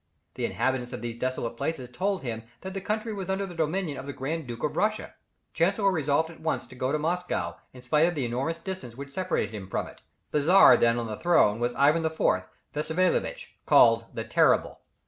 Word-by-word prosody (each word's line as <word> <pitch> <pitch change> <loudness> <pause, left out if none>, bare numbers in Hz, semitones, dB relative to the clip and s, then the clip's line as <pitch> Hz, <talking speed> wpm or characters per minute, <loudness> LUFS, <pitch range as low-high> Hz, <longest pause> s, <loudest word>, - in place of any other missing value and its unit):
The - - -2
inhabitants 130 -1 -1
of 125 - -6
these 120 0 -5
desolate 125 -2 -2
places 140 -4 -3
told 190 +5 -1
him 115 -3 -4 0.2
that 190 0 -6
the 195 - -4
country 215 +3 -2
was 190 -2 -5
under 190 +1 0
the 185 - -8
dominion 165 -1 -1
of 135 - -8
the 140 - -4
Grand 150 +3 -4
Duke 120 -1 -7
of 150 - -1
Russia. 215 +1 0 0.4
Chancellor 195 +4 +2
resolved 160 -1 +1
at 165 - -15
once 160 -1 -2
to - - -14
go 130 +1 -1
to 155 - +1
Moscow, 175 +4 -2
in 125 -1 -14
spite 150 +6 +3
of 175 - -2
the 140 -4 -1
enormous 130 +8 -2
distance 165 -9 -7
which 140 +1 -8
separated 180 - -1
him 95 -3 -7
from - - -2
it. - - -14 0.3
The 150 - +2
Czar 170 -4 +7
then 115 0 +3
on 120 - -2
the 110 -2 -5
throne 140 -11 +3
was 120 0 -1
Ivan 150 +4 +4
IV. 160 0 -3 0.5
Wassiliewitch, 170 - 0 0.2
called - - +6
the - - -3
Terrible. - - +2
155 Hz, 210 wpm, -27 LUFS, 125-180 Hz, 0.5 s, Czar